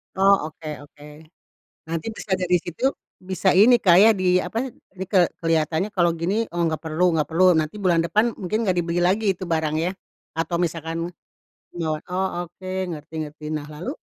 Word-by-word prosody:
Oh, 195 +1 +5 0.2
oke 160 - -11 0.2
oke. 145 0 -19 0.8
Nanti 165 +2 -4
bisa 215 -3 -4
dari 180 -1 +2
situ, 175 +10 -1 0.3
bisa 185 0 +1
ini 225 +6 +7
Kak 180 -6 +5
ya, 220 - +8
di 180 -1 +3
apa, 225 +8 -3 0.3
like 185 -1 +2
kelihatannya 165 +4 0
kalau 175 -3 +3
gini, 200 +7 -1
oh 175 0 -3
nggak 160 -1 -2
perlu 160 +2 -2
nggak 155 -2 0
perlu, 165 +3 +2
nanti 160 +2 0
bulan 180 -5 +2
depan, 215 +8 +1
mungkin 215 +5 -1
nggak 185 - +2
dibeli 170 0 -2
lagi 195 +5 +2
itu 185 - -6
barang 160 -2 0
ya, 170 +3 0 0.4
atau 165 +2 -2
misalkan, 165 -1 -2 0.8
ngewo 160 -3 -2 0.4
oke, 185 +2 -7 0.2
ngerti-ngerti, 155 -2 -7
nah 150 -1 -4
lalu? 160 - -6
175 Hz, 165 wpm, -23 LUFS, 160-190 Hz, 0.8 s, ya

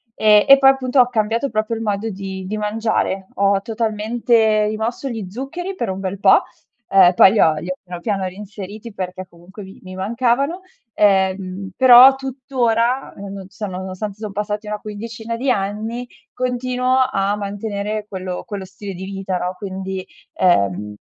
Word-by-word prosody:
Ehm, 210 +1 +5
e 275 0 +9
poi, 270 0 +6
appunto, 265 -1 +1
ho 245 - +2
cambiato 230 +3 0
proprio 215 +1 -1
il 225 - -5
modo 210 +1 -2
di 190 -1 -6
di 215 +2 -3
mangiare. 210 -3 -1
Ho 200 0 +2
totalmente 220 0 +1
rimosso 225 +5 -3
gli 220 -5 -5
zuccheri 330 - -5
per - - -3
un 190 0 -3
bel 195 0 -4
po'. - - +5 0.5
Uhm, 185 -2 +6
poi, 190 - +7
li 220 - +1
ho 160 - +5
li 160 +3 -6
ho 185 - -2
piano, 175 -1 -8
piano 195 -2 -1
reinseriti 205 +3 -8
perché, 185 -1 -6
comunque, 185 +4 -13
mi 190 +1 -13
mi 185 0 -9
mancavano. 245 - 0 0.3
Ehm, 190 -1 +1
però, 260 +1 +8
tuttora, 255 -2 -1
non 195 -1 -8
so, 210 +2 -6
nonostante, 190 +2 -6
son 215 -2 -5
passati 210 +1 -4
una 210 0 -3
quindicina 225 +2 -6
di 260 +3 -2
anni 220 +4 -3 0.3
continuo 255 0 -1 0.2
a 200 -1 0
mantenere 205 +1 -4
quello 185 -2 -5
quello 200 -3 -6
stile 195 +1 -8
di 185 +1 -8
vita, 195 -1 -3
no, 180 +1 -3
quindi, 190 -1 -5 0.3
uhm 105 - +2
210 Hz, 165 wpm, -20 LUFS, 190-230 Hz, 0.5 s, e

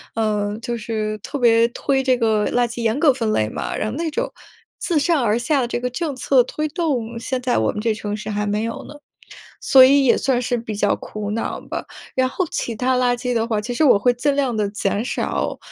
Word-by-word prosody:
呃， 210 -2 -1
就 235 0 -3
是 215 -1 -3
特 245 +7 -6
别 230 -2 +4
推 270 +3 -1
这 260 -1 +2
个 220 -3 +1
垃 245 0 +3
圾 235 0 -6
严 225 +2 +1
格 310 - +6
分 225 -4 -1
类 110 0 +1
嘛， - - -4
然 215 - -2
后 225 - -5
那 330 0 -1
种 - - -2 0.5
自 330 -4 0
上 300 -2 +2
而 220 0 +2
下 280 +3 +1
的 240 - -1
这 240 - -2
个 250 +1 -2
政 300 +4 -3
策 255 0 +3
推 305 +5 -3
动， 280 -8 -2
现 255 +2 -3
在 250 0 0
我 110 - +1
们 - - -5
这 225 -1 +1
城 210 -1 -4
市 210 0 -6
还 210 0 -1
没 205 +1 -1
有 230 0 -5
呢， - - -10 0.7
所 265 -1 +7
以 275 +1 +4
也 245 - +5
算 260 -3 +1
是 245 0 -1
比 225 -2 -5
较 205 - +1
苦 210 -1 -6
恼 225 - -3
吧。 - - -6 0.3
然 260 0 +2
后 365 +7 -1
其 230 - -3
它 255 +3 +1
垃 245 -1 +2
圾 250 0 -3
的 230 -1 0
话， 220 -3 0
其 240 +4 -4
实 275 - +1
我 250 - +6
会 245 +5 +2
尽 280 +4 0
量 270 -4 0
地 210 -1 0
减 205 +1 -1
少 - - -2
240 Hz, 260 characters per minute, -21 LUFS, 215-260 Hz, 0.7 s, 所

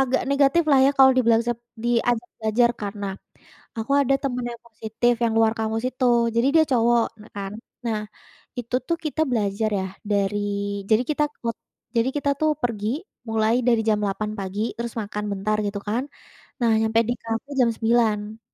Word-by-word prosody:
agak 265 0 +2
negatif 280 +4 +4
lah 275 - +6
ya, 275 - +5
kalau 265 0 +8
dibilang 230 -2 +4
sep 240 -1 -1 0.3
diajak 240 0 +1
belajar, 225 +2 +3
karena, 200 0 -4 0.7
aku 225 +5 -2
ada 275 0 +3
temen 250 -3 -2
yang 235 - -11
positif, 225 +1 0
yang 230 - +1
luar 225 -1 +4
kampus 220 0 -1
itu, 260 +1 -2 0.3
jadi 235 +2 +3
dia 315 - +6
cowok, 235 -1 +4 0.2
nah 215 - -16
kan. 195 -1 -4 0.3
Nah, 220 -2 0 0.6
itu 245 +1 -2
tuh 335 - +1
kita 310 +1 0
belajar 215 -2 0
ya, 190 - -2 0.2
dari 200 0 +1 0.5
jadi 220 +2 +5
kita 300 0 +2 0.2
kut 230 -1 -2 0.4
jadi 230 +2 +3
kita 285 -1 +1
tuh 310 - +3
pergi 215 -3 -1 0.4
mulai 220 0 +2
dari 235 -2 +4
jam 215 -1 +3
8.00 205 +2 -2
pagi, 195 +1 -4 0.2
terus 235 0 -4
makan 210 0 -5
bentar 205 +2 0
gitu 200 0 -3
kan, 230 +4 0 0.6
nah 235 -2 +3
nyampe 220 0 +2
di - - +2
kafe 230 +4 -4
jam 245 - +5
9.00. 220 -2 +1
230 Hz, 175 wpm, -24 LUFS, 215-245 Hz, 0.7 s, kalau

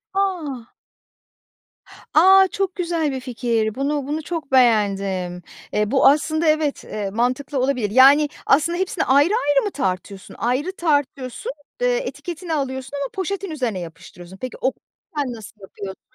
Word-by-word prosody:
A. 320 -12 -2 1.4
A. 380 +4 +7
Çok 385 -1 -2
güzel 335 -4 -1
bir 265 - -3
fikir. 230 -4 -1
Bunu 280 0 -1
bunu 305 +2 -2
çok 315 -4 -5
beğendim. 195 -7 +2 0.3
Eee, 210 0 0
bu 270 - +5
aslında 310 +3 +2
evet, 305 -2 +1
eee, 205 -2 -4
mantıklı 255 +6 -1
olabilir. 255 -5 0
Yani 275 +5 +6 0.2
aslında 315 +5 +3
hepsini 375 -2 -1
ayrı 280 +5 +4
ayrı 290 - +2
mı 410 - -2
tartıyorsun? 190 - -4
Ayrı 260 +9 0
tartıyorsun, 285 -7 -1 0.3
eee, - - +2
etiketini 340 - -5
alıyorsun 270 -1 -3
ama 280 -2 -3
poşetin 385 -1 -3
üzerine 245 -10 -2
yapıştırıyorsun. 175 +2 -11
Peki 255 +3 -6
okusan 270 0 -4
nasıl 220 -1 -11
yapıyorsun? 195 0 -9
275 Hz, 135 wpm, -21 LUFS, 230-315 Hz, 1.4 s, A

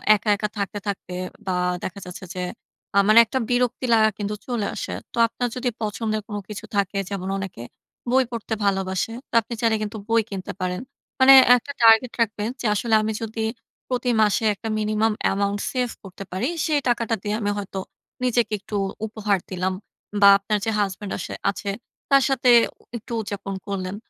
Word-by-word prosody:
একা, 210 +1 -3
একা 210 +1 -2
থাকতে, 200 0 -2
থাকতে 195 -2 -4 0.3
বা 190 - -1 0.3
দেখা 200 +2 -5
যাচ্ছে 180 +1 -8
যে 180 - -3 0.5
আ - - +4
মানে 215 +2 +8
একটা 260 +4 -2
বিরক্তি 245 +1 +1
লাগা 220 -1 +5
কিন্তু 210 0 -3
চলে 240 -5 -1
আসে। - - -4 0.2
তো - - -10
আপনার 245 +2 -2
যদি 250 0 -1
পছন্দের 215 0 -2
কোনো 205 -2 -4
কিছু 205 -3 -6
থাকে 200 0 0
যেমন 190 -2 -4
অনেকে 190 -11 -6 0.5
বই 260 +1 +4
পড়তে 230 -1 -4
ভালোবাসে, 190 +1 0 0.2
তো - - -50
আপনি 225 - -8
চাইলে 225 -1 +3
কিন্তু 215 +1 -4
বই 230 0 +4
কিনতে 190 -2 -5
পারেন। 180 0 -1 0.4
মানে 265 +1 +9 0.2
একটা 250 +3 -3
টার্গেট 225 +2 +6
রাখবেন 215 -1 0
যে - - -5
আসলে 225 +2 +1
আমি 220 0 -1
যদি 225 0 -4 0.5
প্রতি 245 0 0
মাসে 210 +2 +2
একটা 220 +2 -6
minimum 215 +1 +1 0.2
amount 200 +1 0
সেভ 250 -2 0
করতে 195 0 -9
পারি 190 +7 -1 0.2
সেই 305 -3 +2
টাকাটা 230 -2 +1
দিয়ে 210 0 -1
আমি 205 -1 0
হয়তো 195 -1 -4 0.4
নিজেকে 240 -3 +1
একটু 205 - -7 0.3
উপহার 210 -2 0
দিলাম। 185 0 -1 0.5
বা 200 - +9
আপনার 205 +2 -1
যে 225 - +1
হাসব্যান্ড 200 0 -2
আসে - - -5 0.2
আছে 200 0 -4 0.4
তার 275 -1 +6
সাথে 255 -2 +2 0.3
ও - - -23 0.2
একটু 230 +1 -13
উদযাপন 200 -2 -5
করলেন। 190 -1 -3
210 Hz, 180 wpm, -23 LUFS, 200-230 Hz, 0.5 s, মানে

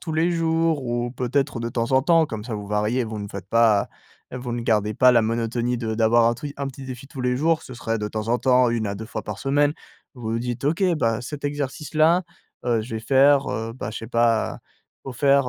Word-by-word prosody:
tous 160 - -5
les 165 +3 +2
jours 165 -3 +1
ou, 120 0 -2
peut-être, 130 0 -1
de 115 - -2
temps 115 +2 -2
en 130 0 +4
temps, 165 0 +4
comme 110 -6 -6
ça 120 -2 -4
vous 105 -1 -7
variez, 105 +4 0
vous 110 -2 -5
ne 100 - -6
faites 100 -1 -8
pas 115 -3 +3 0.4
vous 125 -1 -5
ne 120 - -3
gardez 105 -2 +1
pas 125 +3 +6
la 120 -2 +4
monotonie 115 +2 -1
de 110 -2 -2
d'avoir 115 +1 +4
un 115 - +3
tru 140 +4 -7
un 140 0 -3
petit 135 0 -9
défi 130 +1 -8
tous 135 -1 -8
les 125 0 +1
jours. 160 +3 +1
Ce 130 - -10
serait, 115 -1 -2
de 105 - -3
temps 110 +1 -4
en 120 +1 +2
temps, 125 -1 +4
1 115 -2 -1
à 100 - -4
2 110 - -6
fois - - -5
par 105 -1 -6
semaine. 145 +2 +2 0.4
Vous 125 - -12
vous 115 - 0
dites: 120 +1 -4
«OK, 160 +6 +1 0.2
bah, 115 -2 +1
cet 145 +4 -7
exercice-là, 150 +4 +1 0.4
heu, 120 -2 +1
je 115 +1 -7
vais - - -4
faire, 135 +4 +4
heu, 115 +1 -3
bah, 110 -5 -5
je - - -5
sais 115 - -8
pas, 115 -2 +1 0.5
il 135 - -5
faut - - -6
faire, 140 +1 +3
120 Hz, 250 wpm, -23 LUFS, 115-140 Hz, 0.5 s, pas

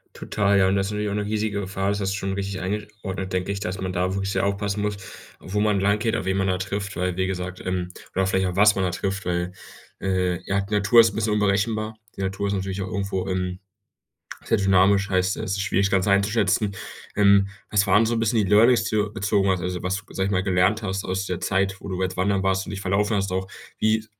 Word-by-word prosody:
Total, 100 -1 +1
ja, 95 - +4
und 95 - +2
das 95 0 +1
ist 105 - -4
natürlich 105 0 -2
auch - - -2
'ne 105 0 -1
riesige 105 -1 -1
Gefahr, 95 0 -2
das 100 - -1
hast 95 0 -1
du - - -2
schon 95 -1 -3
richtig 100 -1 -3
eingesch 105 +3 -3
ordnet, 95 -1 -4
denke 95 +2 -1
ich, 100 - -4
dass 95 -1 -4
man 95 -1 -3
da 90 +1 0
wirklich 95 0 -2
sehr - - +1
aufpassen 100 +1 -1
muss, 105 -1 -1 0.4
wo 105 +2 -3
man 105 -2 +2
langgeht, 105 +3 +1
auf - - -3
wen 95 0 0
man 95 0 +1
da 90 0 +1
trifft, 100 +1 -4
weil 90 -1 -1
wie 95 0 0
gesagt, 90 -1 -4
ähm 90 -1 -2 0.3
oder 95 0 +2
vielleicht 95 0 +1
auch 90 0 -3
was 105 +1 +6
man 95 - -1
da 90 - 0
trifft, 95 +2 -3
weil, 90 0 -1 0.5
äh, 90 -2 0
ja, 100 +1 +1
die 100 +2 -4
Natur 105 +3 +6
ist 115 -2 +4
'n - - -11
bisschen 110 -1 0
unberechenbar. 105 +2 0 0.2
Die - - -4
Natur 95 +1 -2
ist 100 - -1
natürlich 95 0 -3
auch 95 - -4
irgendwo, 100 -1 -2
ähm, 90 -1 -2 0.9
sehr 115 - +2
dynamisch, 100 0 +3
heißt, 95 0 +1
es 95 - -3
ist - - -1
schwierig, 100 0 +1
das - - -7
Ganze 95 0 +2
einzuschätzen. 100 0 +2 0.4
Ähm, 100 -1 +5 0.2
was 105 -1 +3
waren 105 +4 +5
so 115 0 0
bisschen 115 0 +1
die 95 - -2
Learnings, 115 +4 +5
die 110 - -1
du 105 0 0
bezogen 100 -1 +1
hast, 95 -2 +1
also, 90 -1 -3
was 90 +1 -1
du 105 0 -6
g - - -16
sage 95 0 0
ich - - -2
mal, 95 -1 +1
gelernt 95 +3 +2
hast 95 0 -2
aus 95 +1 -2
der 90 -2 -3
Zeit, 95 +1 0
wo - - -9
du 95 -1 -4
jetzt 95 0 -3
wandern 95 +1 +1
warst 95 0 +1
und - - -5
dich 100 -1 -5
verlaufen 105 +3 +1
hast, 95 -1 -1
auch? 95 0 -2 0.3
Wie 110 0 +2
100 Hz, 260 wpm, -24 LUFS, 95-105 Hz, 0.9 s, was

